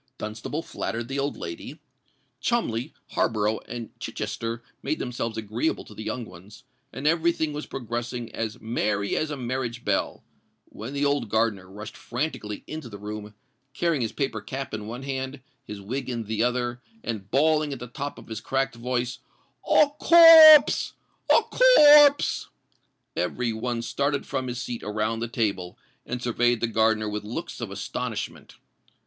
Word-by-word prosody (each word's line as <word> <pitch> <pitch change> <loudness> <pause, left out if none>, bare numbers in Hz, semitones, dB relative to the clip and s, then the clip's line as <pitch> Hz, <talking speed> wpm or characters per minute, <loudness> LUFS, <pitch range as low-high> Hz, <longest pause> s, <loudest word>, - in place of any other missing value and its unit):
Dunstable 110 +9 -5
flattered 115 +1 -4
the 135 +1 -2
old 140 +1 -2
lady: 85 0 -7 0.6
Cholmondeley, 135 - -1 0.2
Harborough, 110 -1 +1
and 120 -1 -6
Chichester 115 +1 -4 0.2
made 155 - -1
themselves 115 -2 -4
agreeable 110 +8 -2
to - - -13
the 105 - -8
young 115 +3 -4
ones; 95 +6 -14 0.3
and 140 - -7
every 165 +2 +3
thing 160 -2 -2
was 150 +1 -5
progressing 120 -1 -5
as 110 -2 -4
"merry 105 -3 -1
as 155 - -1
a 150 - -4
marriage 120 -1 -4
bell," 100 -1 -1 0.5
when 115 +6 -8
the 140 0 0
old 140 -5 0
gardener 110 -4 0
rushed 105 +3 -9
franticly 120 -6 -4
into 155 -6 -7
the 100 - -9
room, 105 0 -7 0.4
carrying 165 -4 +1
his 115 - -1
paper 135 -7 -2
cap 135 +5 -6
in 105 -1 -5
one 120 +4 -6
hand, 130 0 -4 0.3
his 105 -1 -7
wig 125 +8 -4
in 120 -2 -3
the 110 0 -2
other, 120 0 -1 0.2
and 105 -4 -5
bawling 150 +3 +2
at 135 - -4
the 125 - -7
top 140 +4 -6
of - - -13
his 110 -1 -6
cracked 135 +2 -1
voice, 120 +1 -3 0.5
"A 300 - +6
corpse! 325 -3 +9 0.4
a - - +6
corpse!" 300 - +6 0.7
Every 120 -2 -1
one 115 +1 -3
started 140 +4 -1
from 130 -1 -3
his 125 0 -4
seat 120 -2 -5
around 110 +2 -2
the 115 - -2
table, 100 -6 -2 0.3
and 125 0 -4
surveyed 120 0 +2
the - - +1
gardener 110 -1 +2
with 105 0 -4
looks 110 +3 -6
of - - -4
astonishment. - - -5
120 Hz, 160 wpm, -26 LUFS, 110-140 Hz, 0.7 s, corpse